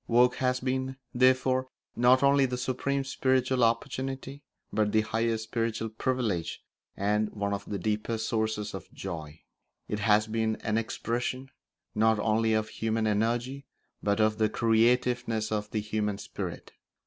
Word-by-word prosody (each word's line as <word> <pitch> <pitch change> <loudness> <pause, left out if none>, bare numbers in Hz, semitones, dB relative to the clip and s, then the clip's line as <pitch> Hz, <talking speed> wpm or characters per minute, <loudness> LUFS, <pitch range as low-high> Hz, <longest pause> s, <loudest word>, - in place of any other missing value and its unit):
Work 125 +1 +4
has 125 -1 +1
been, 130 +1 -2 0.2
therefore, 130 +1 +3 0.3
not 125 +3 +5
only 140 -1 +5
the 125 0 -3
supreme 135 +2 -1
spiritual 130 -1 +1
opportunity, 135 +3 -1 0.3
but 105 -1 +2
the 110 - +4
highest 110 +1 -1
spiritual 115 0 -2
privilege 110 -7 -2 0.3
and 105 +2 +1
one 100 -1 -2
of 100 0 -4
the 100 - -3
deepest 110 +3 -2
sources 110 -2 -1
of 95 - -8
joy. 80 -4 -7 0.5
It 105 - -2
has 105 0 +4
been 110 0 0
an 110 +1 +1
expression 125 +3 -3 0.4
not 110 +1 +3
only 110 +1 +2
of 110 0 0
human 110 0 -1
energy 120 +6 0 0.3
but 100 +1 +1
of 110 0 +2
the 110 -1 +3
creativeness 115 0 +2
of 105 -1 -2
the 110 - -1
human 105 -1 -1
spirit. - - -6
115 Hz, 145 wpm, -29 LUFS, 105-125 Hz, 0.5 s, not